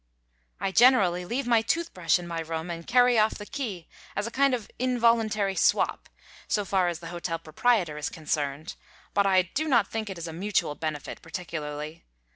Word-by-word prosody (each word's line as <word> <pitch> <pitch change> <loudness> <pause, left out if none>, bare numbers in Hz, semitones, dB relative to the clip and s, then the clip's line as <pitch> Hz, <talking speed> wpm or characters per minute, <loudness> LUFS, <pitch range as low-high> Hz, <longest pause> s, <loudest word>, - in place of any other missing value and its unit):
I 195 +1 -1
generally 195 -7 +5
leave 250 +8 -2
my 235 -2 +4
tooth 335 +8 -1
brush 180 -1 +2
in 175 - -7
my 170 -1 -3
room 165 +1 -4
and 170 0 -7
carry 245 -1 +5
off 215 +1 +3
the 205 - -8
key 210 - -5 0.3
as 205 - -1
a 230 - -5
kind 275 0 +3
of 230 -4 -7
involuntary 230 -5 +2
swap, - - +1 0.4
so 205 -2 0
far 190 -2 +2
as 175 -1 -3
the 165 - -7
hotel 170 -1 -3
proprietor 165 0 0
is 150 - -2
concerned, 150 -1 -3 0.4
but 200 0 +3
I 190 -1 +4
do 290 - -3
not 250 -6 +3
think 220 -2 -3
it 190 - -6
is 170 0 -5
a 165 - -6
mutual 190 -3 0
benefit, 155 -1 -5
particularly. 155 -1 -6
185 Hz, 190 wpm, -27 LUFS, 165-230 Hz, 0.4 s, generally